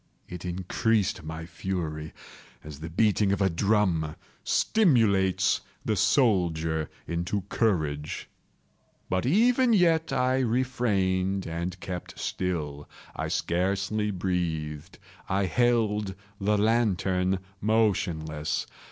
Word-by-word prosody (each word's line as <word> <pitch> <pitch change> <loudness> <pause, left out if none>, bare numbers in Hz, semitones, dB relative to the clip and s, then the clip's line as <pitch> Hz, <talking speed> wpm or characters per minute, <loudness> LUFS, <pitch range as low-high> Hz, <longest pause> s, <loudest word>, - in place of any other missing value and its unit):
It 90 0 -8
increased 95 +4 0
my 80 +1 -6
fury, 80 -3 -4 0.5
as 75 -2 -9
the 80 +1 -6
beating 105 +2 +2
of 100 - 0
a 95 -2 +2
drum 85 -4 +1 0.3
stimulates 110 - +3 0.2
the 110 - +1
soldier 85 - +2 0.2
into 85 +4 -2
courage. 75 -9 -1 0.8
But 95 +5 +1
even 235 - +4
yet 165 -6 +3
I 130 0 +2
refrained 105 -7 0
and 85 +2 -4
kept 90 -2 -6
still. 75 -6 -3 0.3
I - - -2
scarcely 100 +4 0
breathed. 85 -4 -3 0.3
I 95 +1 +1
held 105 -3 +1 0.2
the 105 +1 +2
lantern 95 -4 +2 0.2
motionless. 90 -8 0
95 Hz, 100 wpm, -27 LUFS, 85-110 Hz, 0.8 s, even